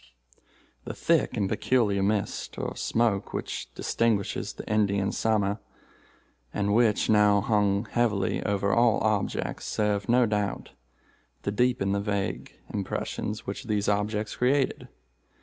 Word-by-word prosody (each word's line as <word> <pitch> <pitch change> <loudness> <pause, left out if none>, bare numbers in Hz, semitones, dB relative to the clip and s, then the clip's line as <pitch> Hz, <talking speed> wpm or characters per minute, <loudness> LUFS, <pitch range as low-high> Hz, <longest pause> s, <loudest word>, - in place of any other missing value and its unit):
"The - - -6
thick 165 -6 +1
and 100 -2 +1
peculiar 105 -2 +1
mist, 100 +1 -1
or - - -3
smoke, 110 -4 0
which - - -4
distinguishes 110 -4 0
the - - -9
Indian 100 -2 +1
Summer, 105 -2 0 0.9
and 100 +5 0
which 115 -1 +3
now 105 -1 +5
hung 100 0 +1
heavily 110 -4 0
over 100 -1 0
all 120 -2 +4
objects, 105 -2 -1
served, 105 0 -1
no 125 +1 +5
doubt, 105 -2 -2 0.7
to 100 - -1
deepen 120 -3 +1
the 100 0 0
vague 100 -1 -2 0.2
impressions 105 +1 -3
which 100 +6 -5
these 105 -2 -1
objects 105 +1 -1
created. 135 +2 +1
105 Hz, 125 wpm, -27 LUFS, 100-110 Hz, 0.9 s, now